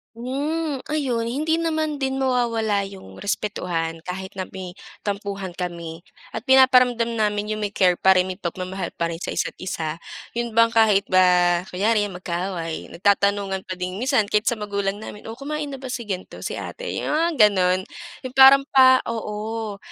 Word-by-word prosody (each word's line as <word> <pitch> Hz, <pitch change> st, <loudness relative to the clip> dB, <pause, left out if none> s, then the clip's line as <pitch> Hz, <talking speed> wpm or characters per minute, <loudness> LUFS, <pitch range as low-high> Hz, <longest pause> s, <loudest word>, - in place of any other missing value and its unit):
Hmm, 285 Hz, +5 st, -2 dB
ayon 260 Hz, -7 st, -1 dB
hindi 310 Hz, +6 st, 0 dB
naman 315 Hz, -3 st, -1 dB
din 265 Hz, 0 st, 0 dB
mawawala 235 Hz, -5 st, +1 dB
'yung 190 Hz, -, -12 dB
respetuhan 175 Hz, -5 st, -2 dB
kahit 190 Hz, +1 st, -5 dB
na 185 Hz, -, -3 dB
may 185 Hz, -2 st, -7 dB, 0.3 s
tampuhan 200 Hz, -2 st, -3 dB
kami 170 Hz, -2 st, -5 dB, 0.3 s
at 225 Hz, -, -4 dB
pinaparamdam 250 Hz, -3 st, +5 dB
namin 210 Hz, 0 st, 0 dB
'yung 215 Hz, -, -4 dB
may 205 Hz, -, -1 dB
care 185 Hz, -2 st, +4 dB
pa 190 Hz, 0 st, +5 dB
rin, 180 Hz, -, +4 dB
may 185 Hz, -, -8 dB
pagmamahal 185 Hz, +1 st, -4 dB
pa 170 Hz, 0 st, -1 dB
rin 165 Hz, -, -7 dB
sa -, -, -4 dB
isa't -, -, -1 dB
isa. 165 Hz, -3 st, -4 dB, 0.3 s
'Yun 235 Hz, -1 st, -3 dB
bang 230 Hz, 0 st, +6 dB
kahit 210 Hz, -3 st, +4 dB
ba 180 Hz, -1 st, +4 dB
kunyari 205 Hz, +3 st, +1 dB
mag-kaaway, 175 Hz, -2 st, -4 dB
nagtatanungan 200 Hz, 0 st, +1 dB
pa 185 Hz, -, -3 dB
din, 185 Hz, +1 st, -4 dB
minsan 235 Hz, -4 st, +2 dB
kahit 210 Hz, +1 st, 0 dB
sa 240 Hz, -, -1 dB
magulang 200 Hz, -2 st, -2 dB
namin, 210 Hz, 0 st, -9 dB
oh 225 Hz, -, -6 dB
kumain 295 Hz, +2 st, -4 dB
na 270 Hz, -, -6 dB
ba 265 Hz, -, -10 dB
si 245 Hz, -, -3 dB
gan'to, 185 Hz, -2 st, -6 dB
si -, -, -4 dB
ate, -, -, -6 dB
'yung -, -, -2 dB
mga 330 Hz, +2 st, +2 dB, 0.2 s
gano'n. 185 Hz, -2 st, +2 dB, 0.5 s
'Yung 255 Hz, -, -6 dB
parang 270 Hz, +1 st, +8 dB
pa 260 Hz, -1 st, +7 dB
oo 220 Hz, -1 st, -4 dB
210 Hz, 170 wpm, -23 LUFS, 185-250 Hz, 0.5 s, parang